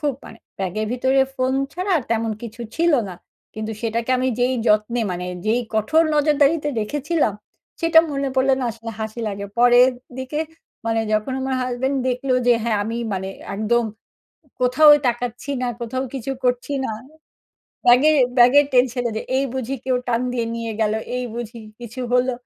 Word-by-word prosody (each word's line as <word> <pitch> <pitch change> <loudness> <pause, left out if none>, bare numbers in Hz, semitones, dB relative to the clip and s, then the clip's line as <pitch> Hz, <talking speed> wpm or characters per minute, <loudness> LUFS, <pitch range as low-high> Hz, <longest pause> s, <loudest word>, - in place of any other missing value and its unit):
খুব 290 -4 0
মানে 225 - -12 0.2
ব্যাগের 195 +3 -2
ভিতরে 260 +2 +2
ফোন 255 0 0 0.2
ছাড়া 365 +4 -3
আর 300 - -1
তেমন 225 0 0
কিছু 230 +1 -8 0.2
ছিল 335 0 +3 0.2
না। 185 - -7 0.4
কিন্তু 215 0 -4
সেটাকে 230 +1 -2
আমি 260 +1 +1
যেই 250 +1 +2
যত্নে 215 +3 +2
মানে 180 0 -4 0.2
যেই 230 +3 +2
কঠোর 220 +10 +3
নজরদারিতে 295 0 +3
রেখেছিলাম, 290 +3 0 0.5
সেটা 330 -1 +5
মনে 275 -1 -1
পড়লে 265 0 +4
না - - -1
আসলে 230 +1 -8
হাসি 220 +2 -4
লাগে। 200 0 -5
পরের 245 +1 +6 0.3
দিকে 260 +3 -4 0.5
মানে 225 0 +1
যখন 215 +5 0
আমার 265 0 -1
হাসব্যান্ড 255 +2 -1
দেখলো 255 +1 -1
যে 245 - +6
হ্যাঁ 225 -2 +1
আমি 225 +2 -3 0.2
মানে 190 0 -3 0.3
একদম 230 +3 +1 0.8
কোথাওই 295 +4 +6
তাকাচ্ছি 245 +2 -3
না, 250 - 0
কোথাও 255 +3 -3
কিছু 270 0 -4
করছি 250 +3 0
না - - -2 1.0
ব্যাগের 270 +6 +6 0.2
ব্যাগের 265 +4 +7
টেনশনে। 245 -1 +2
যে - - -2
এই 270 - +2
বুঝি 260 0 -3
কেউ 255 -1 +1
টান 235 0 +1
দিয়ে 235 -2 -1
নিয়ে 230 -1 -4
গেল, 215 -1 +2 0.2
এই 250 - -2
বুঝি 235 -1 -6 0.2
কিছু 240 +2 -8
হলো। 250 +1 +3
245 Hz, 165 wpm, -21 LUFS, 225-270 Hz, 1.0 s, ব্যাগের